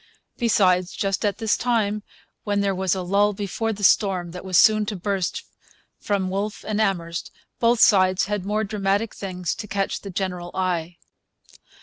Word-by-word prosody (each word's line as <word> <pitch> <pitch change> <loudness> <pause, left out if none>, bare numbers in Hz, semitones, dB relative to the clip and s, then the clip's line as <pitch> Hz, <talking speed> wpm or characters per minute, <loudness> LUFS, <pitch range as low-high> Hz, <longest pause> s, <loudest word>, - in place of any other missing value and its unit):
Besides, 185 -6 +2
just 195 +1 -1
at 205 -2 0
this 225 -3 +1
time, 215 -4 0 0.4
when 205 -1 0
there 200 -1 +1
was 190 0 0
a 185 - -3
lull 200 +3 +2
before 205 +3 -2
the 205 -1 -6
storm 185 -3 +3
that 180 - -8
was 185 -2 +1
soon 215 -1 +6
to 210 - -3
burst 190 -1 -2 0.6
from 195 -3 -1
Wolfe 205 +2 -3
and 215 0 0
Amherst, 170 -5 -1 0.3
both 235 0 +3
sides 185 -4 +5
had 205 -1 -2
more 210 +2 -1
dramatic 200 +1 -1
things 180 -3 -4
to 210 - -7
catch 195 -1 -2
the 200 - -8
general 180 -2 -3
eye. 175 -2 -2
195 Hz, 165 wpm, -23 LUFS, 185-210 Hz, 0.6 s, soon